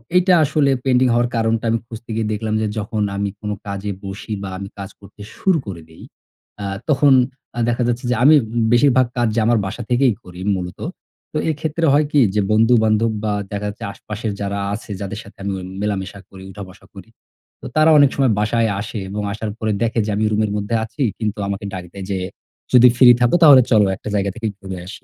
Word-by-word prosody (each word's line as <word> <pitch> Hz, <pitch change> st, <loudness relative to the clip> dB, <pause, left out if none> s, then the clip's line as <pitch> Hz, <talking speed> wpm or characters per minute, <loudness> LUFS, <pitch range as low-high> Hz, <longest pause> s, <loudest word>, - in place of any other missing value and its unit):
এইটা 180 Hz, 0 st, +4 dB
আসলে 140 Hz, -1 st, +2 dB
পেন্ডিং 130 Hz, 0 st, +3 dB
হওয়ার 120 Hz, 0 st, +2 dB
কারণটা 115 Hz, 0 st, 0 dB
আমি 115 Hz, -, +1 dB
খুঁজতে 115 Hz, 0 st, -10 dB
গিয়ে 110 Hz, -1 st, -1 dB
দেখলাম 110 Hz, 0 st, -3 dB
যে 110 Hz, -, 0 dB
যখন 105 Hz, +1 st, -3 dB, 0.2 s
আমি 100 Hz, 0 st, -1 dB
কোনো 105 Hz, 0 st, -3 dB
কাজে 100 Hz, +1 st, -4 dB
বসি 100 Hz, +3 st, -6 dB
বা 95 Hz, -, -5 dB
আমি 100 Hz, 0 st, -7 dB
কাজ 95 Hz, -, -6 dB
করতে 100 Hz, +1 st, -16 dB, 0.2 s
শুরু 190 Hz, -4 st, +2 dB
করে 85 Hz, -4 st, -6 dB
দেই, 80 Hz, -, -15 dB, 0.6 s
আ -, -, -3 dB, 0.2 s
তখন 145 Hz, -1 st, +5 dB, 0.4 s
আ -, -, -1 dB
দেখা 120 Hz, +1 st, 0 dB
যাচ্ছে 120 Hz, +1 st, -2 dB
যে -, -, +2 dB
আমি 155 Hz, +2 st, +7 dB, 0.4 s
বেশিরভাগ 130 Hz, 0 st, +4 dB
কাজ 120 Hz, -1 st, +2 dB
যে -, -, +2 dB
আমার 120 Hz, 0 st, +3 dB
বাসা 110 Hz, +5 st, -5 dB
থেকেই 125 Hz, -1 st, +3 dB
করি 90 Hz, 0 st, -12 dB, 0.2 s
মূলত। 90 Hz, -1 st, -6 dB, 0.5 s
তো -, -, -1 dB
এইক্ষেত্রে 160 Hz, +2 st, -1 dB
হয় 150 Hz, +1 st, +4 dB
কি? 145 Hz, -, +3 dB, 0.2 s
যে 105 Hz, -, +3 dB
বন্ধু-বান্ধব 110 Hz, 0 st, +3 dB
বা 105 Hz, -1 st, 0 dB, 0.2 s
দেখা 100 Hz, 0 st, -3 dB
যাচ্ছে 105 Hz, -, -9 dB
আশপাশের 105 Hz, +1 st, -5 dB
যারা 100 Hz, 0 st, -2 dB
আছে 110 Hz, 0 st, -7 dB
যাদের 100 Hz, +1 st, -5 dB
সাথে 100 Hz, -, -16 dB
আমি 100 Hz, -, -2 dB
ও -, -, -7 dB, 0.2 s
মেলামেশা 100 Hz, -1 st, -3 dB
করি, 95 Hz, -1 st, -12 dB
উঠা-বসা 95 Hz, 0 st, -11 dB
করি। 100 Hz, +3 st, -12 dB, 0.5 s
তো -, -, -11 dB
তারা 155 Hz, +1 st, +5 dB
অনেক 145 Hz, -2 st, +6 dB
সময় 135 Hz, -4 st, +2 dB
বাসায় 115 Hz, +2 st, +1 dB
আসে 105 Hz, 0 st, -5 dB
এবং 105 Hz, +1 st, -4 dB
আসার 110 Hz, -1 st, -4 dB
পরে 110 Hz, -1 st, -1 dB
দেখে 115 Hz, 0 st, 0 dB
যে 110 Hz, -, -2 dB
আমি 110 Hz, -, 0 dB
রুমের 105 Hz, -1 st, 0 dB
মধ্যে 105 Hz, +3 st, -2 dB
আছি। 115 Hz, +6 st, -8 dB, 0.2 s
কিন্তু 105 Hz, -2 st, -3 dB
আমাকে 100 Hz, +1 st, -4 dB
ডাক 90 Hz, -1 st, -5 dB
দেয় 95 Hz, -1 st, -7 dB
যে, 95 Hz, -, -1 dB, 0.6 s
"যদি 125 Hz, 0 st, +8 dB
ফ্রি 125 Hz, 0 st, +7 dB
থাকো 120 Hz, +7 st, +3 dB
তাহলে 140 Hz, -4 st, +9 dB
চলো 105 Hz, -2 st, +5 dB
একটা 105 Hz, -, -8 dB
জায়গা 100 Hz, 0 st, 0 dB
থেকেই 110 Hz, -2 st, -3 dB
ঘুরে 95 Hz, -2 st, -7 dB
আসি। 105 Hz, -, -10 dB
110 Hz, 210 wpm, -19 LUFS, 100-120 Hz, 0.6 s, তাহলে